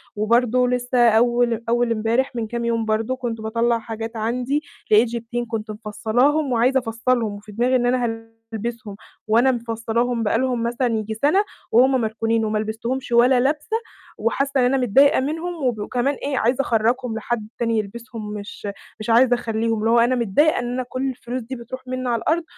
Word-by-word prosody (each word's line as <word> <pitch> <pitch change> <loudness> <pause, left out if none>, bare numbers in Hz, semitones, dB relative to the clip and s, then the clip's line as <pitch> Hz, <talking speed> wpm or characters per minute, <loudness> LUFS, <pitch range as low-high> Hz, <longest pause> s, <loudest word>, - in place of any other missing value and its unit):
وبرضه 240 +3 +2
لِسّه 245 -1 +3
أول 235 0 +2
أول 240 0 +2
إمبارح 230 +4 0
من 230 -2 -2
كام 235 +1 -3
يوم 230 -1 0
برضه 220 +3 0
كنت 235 -3 -4
باطلّع 230 +2 +1
حاجات 225 0 -6
عندي، 250 +6 -1 0.3
لقيت 215 +3 +6
جيبتين 235 +1 -4
كنت 220 -1 -4
مفصّلاهم، 245 +7 0
وعايزة 250 +3 +3
أفصلهم، 230 -1 -1
وفي 205 +1 -11
دماغي 245 +5 +1
إن 245 -1 +2
أنا 245 0 +2 0.5
هالبسهم، 220 -2 -5 0.3
وأنا 235 +5 +4
مفصلاهم 230 0 -1
بقى 215 +1 +1
لهم 250 -2 0
مثلًا 240 +2 0
ييجي 220 -2 -2
سَنة، 295 - +2 0.3
وهُم 255 +2 +4
مركونين، 225 0 0
وما 215 0 0
لبستهمش 230 +5 -4
ولا 245 +2 +5
لبسة، 295 - 0 0.4
وحاسّة 270 +5 0
إن 250 - +4
أنا 270 +2 +2
متضايقة 265 +3 +4
منهم 320 +3 -3
وب 220 -4 -1
كمان 255 +3 0
إيه 275 0 -3
عايزة 245 +4 +2
أخرجّهم 235 0 0
لحد 225 -1 -3
تاني 230 -1 +1
يلبسهم، 215 0 -6
مش 205 0 -7 0.3
مش 215 - -6
عايزة 245 +2 +5
أخليهم، 225 -1 -1
اللي 220 +1 0
هو 235 +1 +5
أنا 240 +2 +3
متضايقة 245 +7 +2
إن 245 0 -3
أنا 255 +1 -2
كل 265 +1 -2
الفلوس 250 0 -5
دي 250 +3 -7
بتروح 255 +2 -9
مِنّي 255 0 -3
على 235 -1 +1
الأرض، 335 +2 +1
235 Hz, 180 wpm, -22 LUFS, 225-255 Hz, 0.5 s, لقيت